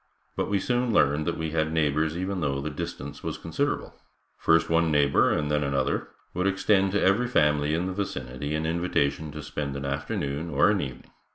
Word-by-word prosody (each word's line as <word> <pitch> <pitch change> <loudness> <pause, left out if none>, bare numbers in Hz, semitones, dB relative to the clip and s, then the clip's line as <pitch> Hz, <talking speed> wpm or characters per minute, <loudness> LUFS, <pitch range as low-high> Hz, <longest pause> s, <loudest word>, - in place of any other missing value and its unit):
But - - -1
we 100 - +2
soon 125 +2 0
learned 75 -6 +3
that 85 - -1
we 80 -1 -3
had 80 0 0
neighbors 80 0 +1
even 95 +1 -2
though 70 -2 0
the 75 +2 -4
distance 70 -1 -6
was - - -4
considerable. - - -2 0.4
First 80 0 +3
one 85 0 +2
neighbor 75 -2 +4
and 75 0 0
then 75 0 +2
another 70 -2 0 0.3
would 90 +2 0
extend 95 0 +2
to 105 - +2
every 100 +6 +3
family 75 -8 +2
in 85 +2 -1
the 95 - -2
vicinity 70 -7 -4
an 80 +1 -1
invitation 80 -3 0
to 75 0 -7
spend 70 -2 -4
an 70 0 -4
afternoon 70 +2 -3
or 75 +6 +4
an 105 - +1
evening. 65 -3 -7
75 Hz, 195 wpm, -26 LUFS, 70-90 Hz, 0.4 s, neighbor